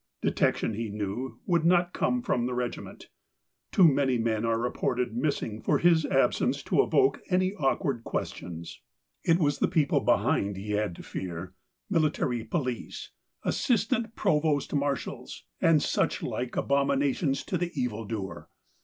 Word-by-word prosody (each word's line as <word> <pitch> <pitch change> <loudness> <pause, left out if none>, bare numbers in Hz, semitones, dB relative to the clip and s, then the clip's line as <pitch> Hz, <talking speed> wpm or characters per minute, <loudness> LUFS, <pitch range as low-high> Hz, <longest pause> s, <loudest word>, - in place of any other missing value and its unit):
Detection, - - +1
he 110 +1 -3
knew, 105 +5 -4
would 170 -3 +2
not 175 +1 +3
come 250 -1 0
from 120 - 0
the 125 - -3
regiment. 125 -1 -5 0.6
Too 180 - +6
many 135 -3 +2
men 115 -1 0
are 115 0 +1
reported 125 0 -1
missing 120 -5 -2
for - - +2
his 170 -2 +4
absence - - +1
to - - +3
evoke 400 -1 +2
any 185 +1 +2
awkward 135 - 0
questions. 85 -5 -5 0.4
It 165 - +4
was 145 -5 +1
the - - +3
people 150 -3 +2
behind 100 -1 +1
he 105 +2 -5
had 105 -3 0
to - - -10
fear, 90 0 -6 0.3
military 155 - 0
police, 125 0 -4 0.3
assistant 230 -1 0
provost 150 -6 +1
marshals, 140 -1 -3 0.2
and 165 -3 +4
such - - 0
like 125 0 -3
abominations 140 +1 +1
to 180 - -2
the 175 0 -1
evil 115 -3 -2
doer. 100 -3 -5
135 Hz, 145 wpm, -28 LUFS, 115-165 Hz, 0.6 s, Too